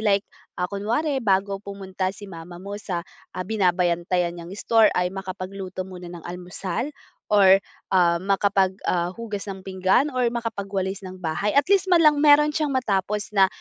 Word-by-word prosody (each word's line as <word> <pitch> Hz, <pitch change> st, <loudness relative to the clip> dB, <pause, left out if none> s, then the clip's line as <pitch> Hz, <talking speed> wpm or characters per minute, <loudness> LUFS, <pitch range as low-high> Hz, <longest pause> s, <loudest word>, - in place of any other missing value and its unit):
like, 200 Hz, -2 st, +2 dB, 0.3 s
ah, 180 Hz, -, 0 dB
kunwari 235 Hz, -, -1 dB
bago 195 Hz, -1 st, +1 dB
pumunta 190 Hz, -2 st, -4 dB
si 205 Hz, -, -10 dB
mama 175 Hz, -1 st, -10 dB
mo 200 Hz, +3 st, -7 dB
sa, 185 Hz, -4 st, -3 dB, 0.3 s
ah, -, -, -2 dB
binabantayan 180 Hz, -3 st, +1 dB
niyang 170 Hz, 0 st, -9 dB
store 225 Hz, 0 st, +4 dB
ay 180 Hz, -, +2 dB
makapagluto 185 Hz, 0 st, -5 dB
muna 180 Hz, -2 st, -9 dB
ng 175 Hz, -2 st, -10 dB
almusal, 180 Hz, -, -4 dB, 0.4 s
or, 195 Hz, -2 st, +7 dB, 0.4 s
ah, 170 Hz, -2 st, +4 dB
makapag 195 Hz, 0 st, +2 dB
ah, 175 Hz, 0 st, +1 dB
hugas 210 Hz, -3 st, -6 dB
ng 190 Hz, -1 st, -6 dB
pinggan, 190 Hz, +9 st, +2 dB
or 255 Hz, -1 st, +1 dB
makapagwalis 200 Hz, -5 st, -3 dB
ng 185 Hz, 0 st, -8 dB
bahay. 170 Hz, +6 st, -1 dB
At 285 Hz, -, +5 dB
least 390 Hz, -1 st, +4 dB
man 345 Hz, -2 st, +6 dB
lang 300 Hz, -2 st, +5 dB
mayro'n 295 Hz, 0 st, +6 dB
siyang 295 Hz, -3 st, 0 dB
matapos 210 Hz, -4 st, -1 dB
na, 195 Hz, -2 st, +5 dB
195 Hz, 165 wpm, -24 LUFS, 185-215 Hz, 0.4 s, or